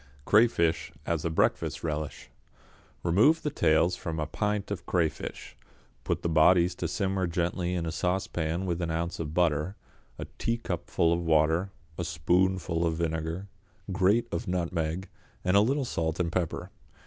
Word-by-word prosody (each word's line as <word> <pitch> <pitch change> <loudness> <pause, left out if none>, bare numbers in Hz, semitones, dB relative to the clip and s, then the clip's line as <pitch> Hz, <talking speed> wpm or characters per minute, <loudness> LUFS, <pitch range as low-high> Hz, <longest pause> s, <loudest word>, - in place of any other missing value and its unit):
=Crayfish, 100 -7 +3
as 85 -2 -1
a 85 - 0
Breakfast 80 - 0
Relish.= 75 -2 -4 0.7
Remove 110 - +4
the 150 - -1
tails 85 - +3
from 80 -2 -4
a 75 - 0
pint 105 +6 -2
of 90 -4 -5
crayfish, 85 -4 -2 0.5
put - - -2
the - - +1
bodies 85 +2 +5
to 90 -1 -3
simmer 95 +2 -1
gently 85 +1 -1
in 85 -2 -1
a 80 - -2
saucepan 90 -1 -1
with 90 -1 -1
an 85 - -1
ounce 85 +1 -2
of 80 -1 -4
butter, 85 +1 +1 0.4
a - - -5
teacupful 85 -7 0
of 85 - 0
water, 80 +3 +2 0.3
a - - 0
spoonful 85 +3 +1
of 80 -1 +1
vinegar, 80 +3 -2 0.4
grate 100 +5 +3
of 115 - -3
nutmeg, 85 0 -2 0.4
and 90 +1 +2
a 100 - +7
little 135 +5 +1
salt 80 -6 -2
and 85 -2 0
pepper. 85 -3 -2
85 Hz, 155 wpm, -28 LUFS, 80-95 Hz, 0.7 s, a